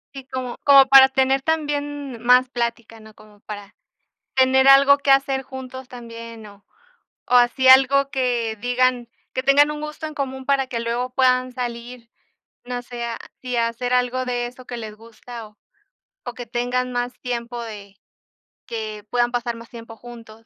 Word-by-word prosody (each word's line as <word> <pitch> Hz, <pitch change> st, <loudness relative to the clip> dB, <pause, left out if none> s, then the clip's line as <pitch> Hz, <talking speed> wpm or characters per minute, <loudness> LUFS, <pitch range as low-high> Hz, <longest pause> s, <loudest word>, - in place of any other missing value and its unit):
Sí, 265 Hz, -1 st, -9 dB
como 255 Hz, -2 st, -5 dB
como 275 Hz, -1 st, +7 dB
para 270 Hz, -1 st, +8 dB
tener 265 Hz, 0 st, +1 dB
también 290 Hz, -4 st, -3 dB
más 250 Hz, +1 st, +5 dB
plática, 235 Hz, -2 st, -4 dB
¿no? 215 Hz, -1 st, -16 dB
Como 210 Hz, -1 st, -19 dB
para 205 Hz, -1 st, -10 dB, 0.6 s
tener 265 Hz, 0 st, +4 dB
algo 275 Hz, +1 st, +7 dB
que 280 Hz, -1 st, +3 dB
hacer 270 Hz, 0 st, +1 dB
juntos 260 Hz, 0 st, -9 dB
también 230 Hz, -2 st, -10 dB
o 200 Hz, -1 st, -16 dB, 0.6 s
o -, -, -4 dB
así 245 Hz, +2 st, +4 dB
algo 270 Hz, +1 st, +6 dB
que 245 Hz, -5 st, -1 dB
digan 245 Hz, 0 st, 0 dB, 0.2 s
que 260 Hz, -, -1 dB
tengan 285 Hz, +2 st, +4 dB
un 300 Hz, 0 st, -6 dB
gusto 305 Hz, +1 st, -6 dB
en 310 Hz, -, -6 dB
común 265 Hz, -2 st, -5 dB
para 275 Hz, -1 st, +1 dB
que 240 Hz, -2 st, -4 dB
luego 235 Hz, +2 st, -2 dB
puedan 255 Hz, 0 st, +1 dB
salir, 240 Hz, -1 st, -6 dB, 0.6 s
no 245 Hz, 0 st, -4 dB
sé 245 Hz, -1 st, -7 dB
a 235 Hz, -1 st, -4 dB, 0.2 s
si 250 Hz, -1 st, -3 dB
a 230 Hz, 0 st, +2 dB
hacer 245 Hz, +2 st, -4 dB
algo 250 Hz, +1 st, +1 dB
de 245 Hz, -1 st, -2 dB
eso 250 Hz, +1 st, -12 dB
que 245 Hz, -1 st, -7 dB
les 220 Hz, -2 st, -7 dB
gusta 230 Hz, +1 st, -11 dB
o 210 Hz, -, -29 dB, 0.7 s
o 245 Hz, -, -6 dB
que 245 Hz, -, -7 dB
tengan 245 Hz, +2 st, -2 dB
más 245 Hz, 0 st, -2 dB
tiempo 240 Hz, -1 st, -5 dB
de 205 Hz, -3 st, -10 dB, 0.7 s
que 215 Hz, -2 st, -6 dB
puedan 240 Hz, +1 st, +1 dB
pasar 240 Hz, -1 st, -2 dB
más 230 Hz, 0 st, -13 dB
tiempo 230 Hz, -1 st, -11 dB
juntos. 230 Hz, -2 st, -13 dB
245 Hz, 175 wpm, -21 LUFS, 235-265 Hz, 0.7 s, para